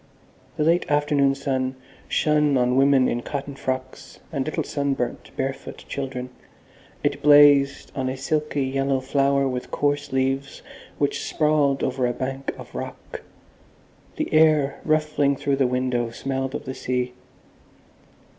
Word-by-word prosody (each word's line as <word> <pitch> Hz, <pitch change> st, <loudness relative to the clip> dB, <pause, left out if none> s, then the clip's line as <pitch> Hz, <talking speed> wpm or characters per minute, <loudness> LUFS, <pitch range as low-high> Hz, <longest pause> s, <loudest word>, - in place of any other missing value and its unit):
The 150 Hz, -, +1 dB
late 170 Hz, +3 st, +2 dB
afternoon 145 Hz, -2 st, +2 dB
sun 130 Hz, -1 st, -2 dB, 0.3 s
shone 150 Hz, -2 st, +2 dB
on 125 Hz, 0 st, +2 dB
women 135 Hz, -1 st, +4 dB
in 120 Hz, -, -1 dB
cotton 140 Hz, +2 st, -5 dB
frocks 130 Hz, -1 st, -5 dB
and 140 Hz, -3 st, 0 dB
little 155 Hz, -, -2 dB
sunburnt, 140 Hz, -4 st, -2 dB
barefoot 135 Hz, 0 st, -4 dB
children. 130 Hz, -2 st, -5 dB, 0.7 s
It 145 Hz, 0 st, 0 dB
blazed 145 Hz, -1 st, +5 dB
on 130 Hz, -1 st, -1 dB
a 130 Hz, -, -4 dB
silky 150 Hz, +1 st, -1 dB
yellow 135 Hz, 0 st, 0 dB
flower 140 Hz, +1 st, +1 dB
with 125 Hz, -1 st, -4 dB
coarse 145 Hz, 0 st, -1 dB
leaves 135 Hz, +1 st, -1 dB, 0.3 s
which 145 Hz, -, 0 dB
sprawled 150 Hz, -3 st, +1 dB
over 130 Hz, -1 st, 0 dB
a 120 Hz, -, -1 dB
bank 135 Hz, +2 st, -4 dB
of -, -, -11 dB
rock. -, -, -7 dB, 0.9 s
The -, -, -3 dB
air 155 Hz, -3 st, +4 dB
ruffling 150 Hz, -2 st, +2 dB
through 135 Hz, 0 st, -1 dB
the 135 Hz, -2 st, +3 dB
window 125 Hz, -1 st, -1 dB
smelled 135 Hz, +2 st, -3 dB
of -, -, -5 dB
the 130 Hz, -, -4 dB
sea. 125 Hz, -1 st, -2 dB
135 Hz, 135 wpm, -23 LUFS, 130-145 Hz, 0.9 s, blazed